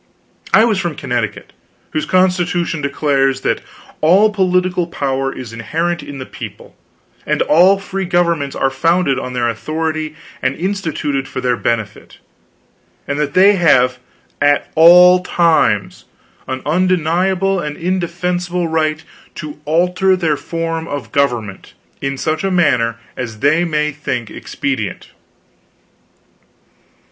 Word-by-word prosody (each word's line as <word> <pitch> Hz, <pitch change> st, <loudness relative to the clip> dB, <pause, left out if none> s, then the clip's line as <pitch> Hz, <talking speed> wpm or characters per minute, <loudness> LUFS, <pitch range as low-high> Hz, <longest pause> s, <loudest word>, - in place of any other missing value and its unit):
I 220 Hz, -, +6 dB
was 215 Hz, -5 st, +1 dB
from 175 Hz, -5 st, -3 dB
Connecticut, 120 Hz, -7 st, -3 dB, 0.4 s
whose 155 Hz, -, -2 dB
Constitution 180 Hz, -3 st, +1 dB
declares 140 Hz, -2 st, 0 dB
"that -, -, -1 dB, 0.4 s
all 190 Hz, +7 st, +5 dB
political 180 Hz, -3 st, +1 dB
power 135 Hz, -4 st, -2 dB
is 125 Hz, -4 st, -8 dB
inherent 165 Hz, +10 st, -2 dB
in 145 Hz, -, -9 dB
the 130 Hz, -, -6 dB
people, -, -, -10 dB, 0.5 s
and -, -, 0 dB
all 180 Hz, +6 st, +5 dB
free 195 Hz, 0 st, -4 dB
governments 170 Hz, -6 st, 0 dB
are 135 Hz, -, 0 dB
founded 155 Hz, 0 st, +1 dB
on 125 Hz, -1 st, -6 dB
their 120 Hz, -1 st, 0 dB
authority 155 Hz, +6 st, -3 dB, 0.3 s
and 130 Hz, +1 st, 0 dB
instituted 160 Hz, -7 st, -2 dB
for -, -, -5 dB
their 125 Hz, -1 st, +1 dB
benefit; 110 Hz, -3 st, -3 dB, 0.9 s
and 140 Hz, +1 st, -2 dB
that 145 Hz, -2 st, -2 dB
they 195 Hz, +3 st, +6 dB
have 130 Hz, -7 st, +3 dB, 0.4 s
at 145 Hz, 0 st, +2 dB
all 180 Hz, +3 st, +7 dB
times 170 Hz, -2 st, +1 dB, 0.4 s
an 130 Hz, 0 st, -4 dB
undeniable 185 Hz, +3 st, +1 dB
and 150 Hz, -3 st, -5 dB
indefeasible 175 Hz, 0 st, -2 dB
right 160 Hz, -1 st, -1 dB, 0.3 s
to 150 Hz, -1 st, -8 dB
alter 180 Hz, +4 st, +2 dB
their 165 Hz, -5 st, 0 dB
form 165 Hz, +1 st, -4 dB
of 145 Hz, -2 st, -6 dB
government 120 Hz, -8 st, -2 dB, 0.3 s
in 140 Hz, 0 st, -2 dB
such 155 Hz, +5 st, -2 dB
a 195 Hz, -, +1 dB
manner 125 Hz, -, +2 dB, 0.2 s
as 115 Hz, -4 st, -5 dB
they 155 Hz, +4 st, +3 dB
may 150 Hz, -3 st, 0 dB
think 125 Hz, -6 st, -4 dB
expedient." 130 Hz, -8 st, -4 dB
160 Hz, 125 wpm, -17 LUFS, 135-180 Hz, 0.9 s, all